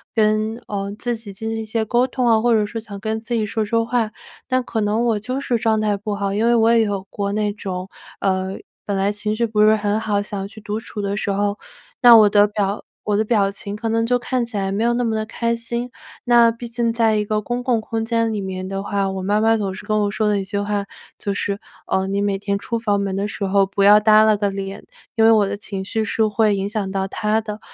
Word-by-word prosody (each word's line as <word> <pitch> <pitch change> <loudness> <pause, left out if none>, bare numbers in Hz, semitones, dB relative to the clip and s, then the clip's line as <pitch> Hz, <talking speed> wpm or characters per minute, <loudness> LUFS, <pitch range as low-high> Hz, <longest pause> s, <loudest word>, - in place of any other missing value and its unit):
跟， 215 0 +2
呃， 200 0 -3
自 240 -1 -2
己 215 -3 -10
进 220 +3 -5
行 225 - -3
一 220 - -4
些 220 +1 -1
沟 240 +3 +2
通 255 -1 -2
哦， 225 -2 +4
或 240 +1 +3
者 215 -2 +3
是 225 +2 -5
想 215 -3 -9
跟 220 +2 -2
自 230 +2 -5
己 225 -2 +1
说 215 +1 -2
说 230 +2 +1
话， 230 -2 0 0.4
那 255 -1 +1
可 235 -2 -3
能 215 +2 +1
我 230 -3 +1
就 255 +6 -3
是 245 -3 0
状 220 -1 +1
态 210 -1 +1
不 205 0 -4
好， 200 -1 -2
因 215 +3 +1
为 235 0 +4
我 225 0 +4
也 225 -1 +4
有 200 -2 -2
过 200 -1 -3
那 210 0 0
种， 190 -2 -5 0.3
呃， 190 0 0 0.3
本 200 - -2
来 195 +1 +1
情 210 +1 -3
绪 235 - +1
不 215 -2 0
是 215 +1 +6
很 210 0 0
好， 210 -2 0
想 200 -1 -5
去 215 +1 -13
独 210 +1 -3
处 215 -1 -7
的 200 0 -2
时 205 - -1
候， 205 +1 -1 0.4
那 240 -1 +9
我 215 -2 +7
的 205 0 +5
表 205 -1 -2 0.2
我 205 -1 0
的 215 - +1
表 205 -3 +2
情 200 0 -7
可 225 +2 -3
能 225 0 +1
就 245 +1 +2
看 245 0 -1
起 230 -1 -10
来 195 -1 -1
没 205 +3 -1
有 235 +1 +2
那 245 +1 0
么 225 -2 0
的 215 0 -1
开 235 +1 -1
心。 235 +1 -4 0.4
那 235 -1 +6
毕 235 +1 -8
竟 235 0 -1
在 225 -2 +2
一 210 0 0
个 215 0 -1
公 240 +3 -3
共 245 -3 +1
空 225 0 -3
间 230 0 +1
里 215 - -2
面 185 -1 -5
的 195 0 -4
话， 200 -1 -1
我 190 0 -4
妈 205 +2 +1
妈 225 +1 +4
总 195 -3 -2
是 190 - -9
跟 215 0 +1
我 205 -1 0
说 215 0 0
的 205 -1 +1
一 - - -3
句 200 +1 -3
话， 205 0 -1 0.3
就 200 - -3
是， 200 +1 -2 0.3
呃， 190 0 +1
“你 200 +1 -1
每 200 -1 0
天 200 0 -2
出 230 - -3
房 210 -3 0
门 195 -1 -2
的 200 +1 -1
时 205 - -6
候 195 0 +3
不 195 +1 -3
要 205 +1 +8
耷 215 0 +6
拉 215 -1 +4
个 205 -1 0
脸， 195 0 -6 0.3
“因 225 - +5
为 225 - +7
我 210 -3 +4
的 205 - -3
情 200 -1 -5
绪 220 +3 -2
是 220 +1 +1
会 210 0 +2
影 195 0 -2
响 205 -3 -3
到 190 0 -1
她 215 +2 0
的。 210 -1 -6
210 Hz, 290 characters per minute, -21 LUFS, 200-225 Hz, 0.4 s, 那